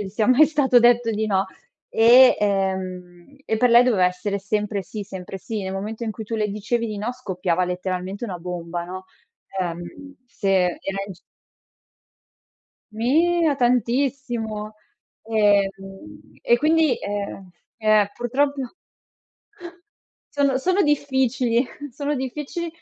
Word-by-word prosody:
gli 200 - -4
sia 210 +2 -1
mai 265 +4 +6
stato 275 -5 +3
detto 240 -1 +4
di 215 0 -1
no. 195 -2 +1 0.5
E 245 +3 +7
ehm, 190 +1 -2
e 220 - -1
per 250 +2 +4
lei 240 +1 +8
doveva 200 -8 +3
essere 190 +3 -2
sempre 210 0 -2
sì 205 +4 -7
sempre 190 -1 -8
sì. 200 +2 -5
Nel 190 - -4
momento 215 +4 -5
in 225 - -2
cui 220 0 -7
tu 225 - -5
le 210 -1 0
dicevi 230 +4 -2
di 215 -2 -5
no 220 +5 -3
scoppiava 185 -7 -1
letteralmente 185 +3 -4
una 185 -5 -5
bomba, 175 0 -5
no. 185 +1 -8 0.6
Ehm, 175 +12 -6
se 200 -4 -4 0.3
era 195 0 -4
in 195 - -7
gi 175 - -18 1.7
Mia 310 +6 +2
tantissimo. 240 -3 -1 0.5
Ehm, 205 +5 0 0.2
e 235 - +3
quindi, 315 -1 +3
ehm 200 -2 -5 0.3
eh, 215 -2 +3
purtroppo 275 +4 0 1.8
sono 280 -2 +2
sono 370 +8 +2
difficili 265 -4 +1 0.3
sono 285 +3 -2
difficili, 295 +6 -4
220 Hz, 130 wpm, -22 LUFS, 195-255 Hz, 1.8 s, lei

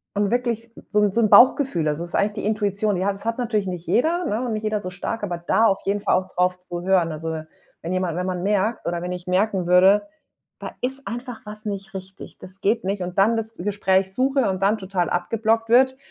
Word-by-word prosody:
und 205 0 +1
wirklich 235 -2 -1 0.2
so 210 - +3
'n 205 -1 +3
so 235 - +2
'n 215 - +3
Bauchgefühl, 245 - +5
also 150 +2 -1
das 175 - -9
ist - - -4
eigentlich 205 +1 +1
die - - -3
Intuition, 205 -1 0
die 185 +1 -1
hat 200 0 0
das 200 - -13
hat 230 0 -1
natürlich 220 -5 -1
nicht 180 -2 -5
jeder, 340 +7 +1
ne? 225 -6 -1
Und 235 - -2
nicht 215 0 -3
jeder 215 -1 -1
so 185 - -5
stark, 205 +4 -5
aber 180 -4 -2
da 190 +6 +2
auf 195 -3 +2
jeden 200 +1 0
Fall - - +2
auch 185 0 -2
drauf 180 0 +1
zu 175 -1 -7
hören. 180 -3 +2
Also 160 0 -4 0.4
wenn 170 +2 -3
jemand 185 -3 -1
wenn 180 - -2
man 180 -1 -2
merkt 210 +3 0
oder 170 0 -2
wenn 180 +1 -4
ich 180 -1 -6
merken 190 0 +1
würde: 190 +8 +5 0.5
„Da - - -6
ist 265 +2 -4
einfach 240 0 -6
was 210 +1 -6
nicht 195 -2 -5
richtig, 190 0 -9
das 185 +1 -11
geht 220 +3 +1
nicht“, 195 0 -2
und 180 +1 -6
dann 220 +4 +4
das 225 0 -5
Gespräch 190 0 0
suche 265 +1 +1
und 190 0 -3
dann 205 +3 +3
total 190 -3 -2
abgeblockt 225 +5 0
wird, 260 +2 +4
200 Hz, 240 wpm, -23 LUFS, 180-225 Hz, 0.5 s, Bauchgefühl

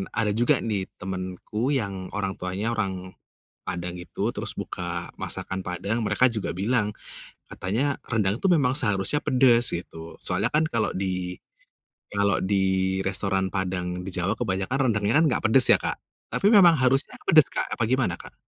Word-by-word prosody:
ada 110 -2 +1
juga 115 +4 +2
nih 100 -4 -2 0.2
temenku 95 +7 -3
yang 100 -7 -2
orang 100 -2 -3
tuanya 95 +5 -3
orang, 95 -2 -4 0.4
Padang 90 0 -4
itu 90 - -8
terus - - -2
buka 85 -1 -5
masakan 95 0 -4
Padang 95 +6 -3
mereka 120 +3 +2
juga 110 -4 -2
bilang, 105 +3 0 0.6
katanya 125 +9 -1
rendang 110 -2 0
tuh 195 - 0
memang 135 -5 +2
seharusnya 105 +3 +1
pedes 125 -3 +3
gitu 80 -1 -7
soalnya 95 +4 0
kan 155 - +4
kalau 115 -2 +1
di 90 -1 -2 0.8
kalau 100 -1 +2
di 100 +1 0 0.5
restoran 95 0 -1
Padang 90 -1 -3
di - - -4
Jawa 95 +5 -1
kebanyakan 95 +3 -1 0.2
rendangnya 105 +1 0
kan - - +4
gak - - -1
pedes 130 +2 +5
ya, - - +5
Kak. - - -2 0.3
Tapi 195 - +1
memang 175 -6 +7
harusnya 130 +1 +2
pedes, 155 -4 +6
Kak, - - -1
apa 120 - -1
gimana, 130 -9 +1
Kak? - - -15
100 Hz, 160 wpm, -25 LUFS, 95-120 Hz, 0.8 s, memang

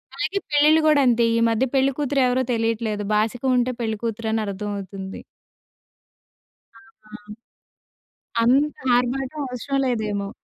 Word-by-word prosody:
అలాగే 395 - -2
పెళ్ళిళ్ళు 300 +2 +5
గూడంతే. 265 -6 +4
ఈ - - +2
మధ్య 230 +3 +1
పెళ్ళికూతురు 275 +1 +1
ఎవరో 250 +1 +1
తెలీట్లేదు. 225 -2 -1
బాసికం 230 +5 0
ఉంటే 250 +1 +1
పెళ్ళికూతురు 225 0 -3
అని 225 - 0
అర్ధమవుతుంది. 195 -1 -6 1.9
ఆహా! 215 - -10 1.2
అంత 275 +5 +3 0.2
ఆర్భాటం 265 +4 -2
అవసరం 255 +2 -3
లేదేమో. 210 -5 -2
240 Hz, 105 wpm, -22 LUFS, 215-270 Hz, 1.9 s, పెళ్ళిళ్ళు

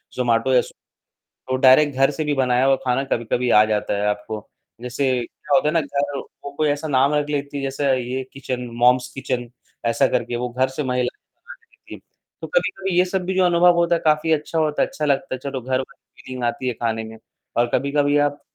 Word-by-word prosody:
जोमाटो 120 +1 +1
या 125 - +6
स्व - - -11 0.8
तो 130 - +2
डायरेक्ट 135 +2 +5
घर 135 +1 +4
से 155 +2 -3
भी 150 -1 0
बनाया 130 -1 +2
हुआ 135 0 +4
खाना 125 +1 +1
कभी-कभी 120 0 -1
आ 105 -1 +7
जाता 105 -1 -1
है 100 +1 -1
आपको, 105 +1 -4 0.3
जैसे 125 +3 -2 0.2
क्या - - -4
होता 175 -4 +3
है - - 0
ना 165 - +4
घर 140 -1 -2 0.2
को 140 - -6
कोई 155 -1 +1
ऐसा 145 +2 -1
नाम 135 +1 +3
रख 150 0 0
लेती 145 -1 -3
हैं 140 - -3
जैसे 135 +1 -2
ये 125 +2 -3
किचन, 130 -2 -5
मॉम्स 125 +1 +3
किचन 125 -2 -3 0.4
ऐसा 115 +3 +3
करके 120 - -1
वो 125 +1 -2
घर 130 +2 0
से 130 +3 -4
महिलाएँ 125 -1 0
बनाके - - -62 0.5
देती - - -13
हैं - - -11 0.4
तो - - -3
कभी-कभी 195 - 0
ये 180 - +6
सब 185 0 -2
भी 190 +1 -2
जो 185 - +3
अनुभव 175 0 +5
होता 170 0 +3
है 165 - -1
काफ़ी 155 +1 +2
अच्छा 155 +2 -1
होता 155 -2 +1
है, - - +3
अच्छा 150 - -4
लगता 140 +1 0
है, - - -5
चलो 135 0 -5
घर 130 +1 -1
वाली 130 - -13
फीलिंग 130 -1 -6
आती 120 +2 -1
है 120 - -2
खाने 115 -1 -2
में 110 0 -10 0.4
और 120 - +3
कभी-कभी 145 +1 +1
आप 145 - -12
135 Hz, 225 wpm, -21 LUFS, 125-150 Hz, 0.8 s, आ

